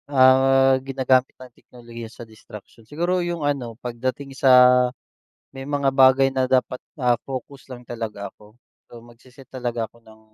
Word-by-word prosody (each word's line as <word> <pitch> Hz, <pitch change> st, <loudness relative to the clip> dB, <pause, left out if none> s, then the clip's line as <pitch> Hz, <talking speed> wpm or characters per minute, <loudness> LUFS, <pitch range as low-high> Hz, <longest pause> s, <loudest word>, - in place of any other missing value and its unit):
Ah, 135 Hz, 0 st, +4 dB
ginagamit 130 Hz, -1 st, +1 dB
ng 130 Hz, -1 st, -14 dB
teknolohiya 120 Hz, -2 st, -12 dB
sa 120 Hz, -, -12 dB
distraction 110 Hz, 0 st, -15 dB
siguro 175 Hz, +4 st, -1 dB
yung 170 Hz, -3 st, -4 dB
ano 125 Hz, -6 st, -3 dB
pagdating 130 Hz, +3 st, -5 dB
sa. 125 Hz, -1 st, +5 dB, 0.6 s
May 135 Hz, +1 st, -9 dB
mga 140 Hz, -2 st, 0 dB
bagay 135 Hz, 0 st, +4 dB
na 130 Hz, -1 st, -1 dB
dapat, 125 Hz, -1 st, 0 dB, 0.2 s
ah, 125 Hz, -3 st, +2 dB, 0.2 s
focus 135 Hz, +1 st, -8 dB
lang 125 Hz, -1 st, -11 dB
talaga 110 Hz, -4 st, -6 dB
ako. 105 Hz, +2 st, -21 dB, 0.3 s
So 120 Hz, -1 st, -14 dB
magse-set 125 Hz, +3 st, -18 dB
talaga 120 Hz, -3 st, -4 dB
ako 110 Hz, +2 st, -21 dB
ng 110 Hz, -1 st, -19 dB
130 Hz, 150 wpm, -22 LUFS, 120-135 Hz, 0.6 s, sa